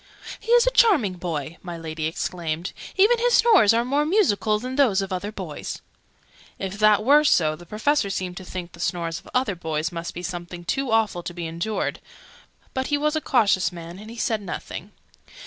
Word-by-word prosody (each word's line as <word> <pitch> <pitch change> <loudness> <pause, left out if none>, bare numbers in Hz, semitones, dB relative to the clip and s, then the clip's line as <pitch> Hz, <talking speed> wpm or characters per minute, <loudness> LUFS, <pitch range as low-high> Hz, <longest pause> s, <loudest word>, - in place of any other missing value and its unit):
"He 460 - -4
is 485 0 +6
a - - +3
charming 360 - +4
boy!" 165 -3 -5
my 175 -2 -7
Lady 160 -1 -4
exclaimed. 165 0 -3 0.2
"Even 430 +5 +5
his 485 +1 +3
snores 425 - +6
are 230 +1 +2
more 280 +4 +1
musical 300 - +2
than 255 +4 -5
those 250 -9 +3
of 190 -1 -5
other 200 +3 -3
boys!" - - -6 0.8
If 195 +1 -5
that 215 -1 +5
were 295 +3 +6
so, 155 - +3
the 175 +2 -14
Professor 220 - +1
seemed 185 -2 -3
to 190 - -7
think, 180 -1 -6
the 170 - -15
snores 170 -2 -2
of - - -16
other 250 -5 +2
boys 160 -1 -3
must 170 0 -6
be 175 - -6
something 175 -1 -6
too 270 +7 -1
awful 220 -5 +1
to 175 0 -7
be 175 -1 -4
endured: 170 +7 -2 0.7
but 260 0 -2
he 290 - +1
was 300 +1 0
a 315 - 0
cautious 200 -9 +2
man, 170 +1 -9
and 215 +1 -10
he 230 - -10
said 220 -2 0
nothing. 200 - -7
200 Hz, 200 wpm, -24 LUFS, 175-260 Hz, 0.8 s, is